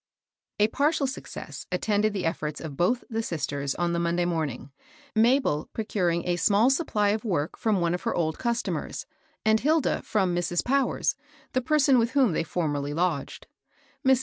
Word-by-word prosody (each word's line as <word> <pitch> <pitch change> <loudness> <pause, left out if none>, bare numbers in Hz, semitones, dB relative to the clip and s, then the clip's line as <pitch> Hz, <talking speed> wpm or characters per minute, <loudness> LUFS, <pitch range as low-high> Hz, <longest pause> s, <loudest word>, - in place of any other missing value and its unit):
PARTIAL 295 0 +2
success 265 0 -7
attended 210 +3 +1
the 195 -4 -3
efforts 155 -2 -2
of 155 -4 -7
both 230 - +1
the 225 -1 -2
sisters 140 - -2
on 175 -1 0
the 170 - 0
Monday 170 +1 +1
morn 165 -4 0
ing, 130 +2 -9 0.2
— 290 -3 -27
Mabel 230 - +3
procuring 180 -6 -1
a 175 0 +1
small 210 +7 +4
supply 220 -8 +1
of 210 +1 0
work 170 -9 -1
from 215 -5 +1
one 170 0 +1
of 180 - -2
her - - -1
old 160 -2 -1
customers, 235 -1 -2 0.4
and 220 0 +4
Hilda 310 +3 +2
from 190 -5 0
Mrs. 175 0 0
Powers, 270 0 +1 0.4
the 255 - +2
person 275 -1 +4
with 230 +2 0
whom 265 -7 +4
they - - 0
formerly 145 -4 -2
lodged. 165 -5 -1 0.6
Mrs. 265 -2 +5
195 Hz, 175 wpm, -26 LUFS, 165-240 Hz, 0.6 s, Mrs